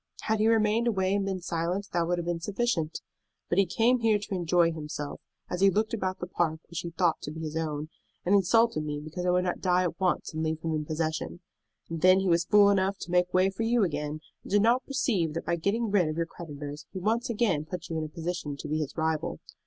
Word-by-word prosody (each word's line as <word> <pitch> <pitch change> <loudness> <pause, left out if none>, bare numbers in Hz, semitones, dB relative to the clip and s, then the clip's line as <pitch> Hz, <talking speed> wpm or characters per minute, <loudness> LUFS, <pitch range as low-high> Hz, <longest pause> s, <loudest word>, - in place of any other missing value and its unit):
Had 220 -1 0
he 215 - +3
remained 225 +1 +3
away 190 -4 +1
and 200 -1 +1
been 190 -2 -2
silent, 175 +4 -2
that 170 -1 +1
would 175 0 +1
have 170 - -3
been 175 -1 -1
sufficient. 190 -4 -1 0.5
But 170 - +2
he 195 - +4
came 230 +7 +3
here 225 -2 +3
to 205 0 -6
enjoy 175 -1 +3
himself, 150 -2 -6 0.3
as 180 - -4
he 195 - +7
looked 215 +3 0
about 190 -4 -1
the - - -3
park 165 -3 -1
which 170 -1 -5
he 175 - -4
thought 170 -1 +1
to - - -5
be 160 +2 -7
his 155 -1 -5
own, 155 -1 -2 0.4
and 185 - +2
insulted 205 -2 +4
me 150 -1 -3
because 160 +4 -5
I - - +3
would 180 0 +3
not 180 - -2
die 180 -1 +3
at 170 -2 -3
once 185 -3 0
and 160 - -3
leave 160 0 -1
him 160 0 -2
in 155 -1 -1
possession. 155 - -3 0.5
And 165 -1 -5
then 185 +1 +6
he 190 - -1
was 170 0 +3
fool 205 -2 +6
enough 195 0 +1
to 175 - -6
make 180 0 +2
way 185 +1 +3
for 195 - -6
you 230 0 +3
again, 150 -2 -2 0.2
and - - -12
did 205 0 +4
not 240 +3 +3
perceive 205 - 0
that 165 - -3
by 170 - +1
getting 205 +6 -1
rid 190 -5 +3
of 155 +1 -3
your 165 - +1
creditors 150 -3 -8
he - - -7
once 220 +6 0
again 205 -10 +1
put 180 +2 -6
you 165 - -3
into 155 -1 -2
a - - -14
position 165 -3 -4
to 150 - -7
be 155 +1 -1
his 150 0 -4
rival. 160 -1 -1
175 Hz, 250 wpm, -28 LUFS, 160-200 Hz, 0.5 s, he